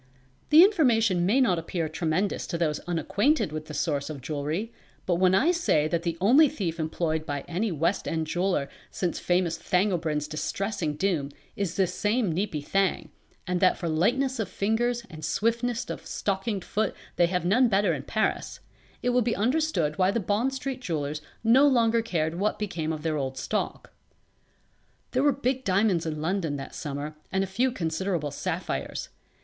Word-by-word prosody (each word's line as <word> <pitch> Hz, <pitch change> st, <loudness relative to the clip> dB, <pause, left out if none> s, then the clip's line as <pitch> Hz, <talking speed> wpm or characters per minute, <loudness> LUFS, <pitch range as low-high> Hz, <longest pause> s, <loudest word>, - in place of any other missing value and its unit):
The 310 Hz, +3 st, +9 dB
information 230 Hz, -, +3 dB
may 235 Hz, +7 st, +3 dB
not 190 Hz, -10 st, +3 dB
appear 165 Hz, 0 st, -2 dB
tremendous 160 Hz, +5 st, -1 dB
to 170 Hz, -, -2 dB
those 155 Hz, -3 st, 0 dB
unacquainted 200 Hz, -, +1 dB
with 155 Hz, 0 st, -5 dB
the 150 Hz, -, -7 dB
source 145 Hz, -1 st, -1 dB
of 150 Hz, -3 st, -6 dB
jewelry; 155 Hz, -, -3 dB, 0.3 s
but 175 Hz, -2 st, +1 dB
when 185 Hz, +1 st, +4 dB
I 290 Hz, -, +4 dB
say 330 Hz, -, +2 dB
that 170 Hz, +1 st, -1 dB
the 170 Hz, -1 st, -2 dB
only 265 Hz, +11 st, +6 dB
thief 175 Hz, -7 st, -3 dB
employed 160 Hz, 0 st, -1 dB
by 145 Hz, -2 st, -3 dB
any 185 Hz, +8 st, -2 dB
West 165 Hz, +4 st, 0 dB
end 160 Hz, -1 st, -1 dB
jeweller 175 Hz, -3 st, 0 dB, 0.2 s
since 180 Hz, -2 st, -2 dB
famous 175 Hz, -2 st, 0 dB
Thangobrind's 165 Hz, -6 st, 0 dB
distressing 160 Hz, +1 st, -2 dB
doom 160 Hz, -5 st, 0 dB, 0.3 s
is 190 Hz, -4 st, -2 dB
this 185 Hz, -2 st, +1 dB
same 210 Hz, -3 st, +1 dB
Neepy 165 Hz, -5 st, -2 dB
Thang, 195 Hz, +1 st, 0 dB, 0.3 s
and 180 Hz, 0 st, -1 dB
that 185 Hz, -, +4 dB
for 175 Hz, -, -3 dB
lightness 245 Hz, +11 st, +1 dB
of 210 Hz, -4 st, -2 dB
fingers 235 Hz, +5 st, 0 dB
and 155 Hz, -1 st, -11 dB
swiftness 230 Hz, +8 st, 0 dB
of -, -, -6 dB
stockinged 195 Hz, 0 st, -2 dB
foot 215 Hz, +1 st, -1 dB, 0.2 s
they 175 Hz, -, +5 dB
have 180 Hz, 0 st, -1 dB
none 235 Hz, +8 st, +4 dB
better 200 Hz, -4 st, +2 dB
in 140 Hz, -, -3 dB
Paris, 220 Hz, -1 st, -1 dB, 0.4 s
it 245 Hz, -, +2 dB
will 250 Hz, 0 st, +3 dB
be 230 Hz, 0 st, 0 dB
understood 225 Hz, -, 0 dB
why 185 Hz, 0 st, +4 dB
the 230 Hz, -, +1 dB
Bond 210 Hz, +6 st, 0 dB
Street 265 Hz, -1 st, -4 dB
jewellers 150 Hz, -, -3 dB, 0.2 s
no 255 Hz, +6 st, +6 dB
longer 230 Hz, -4 st, +3 dB
cared 170 Hz, -6 st, -1 dB
what 210 Hz, +2 st, 0 dB
became 170 Hz, -7 st, -3 dB
of 155 Hz, -1 st, -5 dB
their 160 Hz, -2 st, 0 dB
old 135 Hz, -2 st, -3 dB
stock. -, -, -3 dB, 1.2 s
There 255 Hz, -, +1 dB
were 290 Hz, +1 st, +5 dB
big 260 Hz, 0 st, -1 dB
diamonds 190 Hz, -4 st, +2 dB
in 155 Hz, -1 st, -3 dB
London 165 Hz, -3 st, -1 dB
that 135 Hz, -1 st, -7 dB
summer 145 Hz, +1 st, -5 dB, 0.2 s
and 190 Hz, 0 st, +1 dB
a -, -, 0 dB
few 240 Hz, +7 st, 0 dB
considerable 165 Hz, -, -2 dB
sapphires. -, -, -3 dB
185 Hz, 175 wpm, -27 LUFS, 160-225 Hz, 1.2 s, The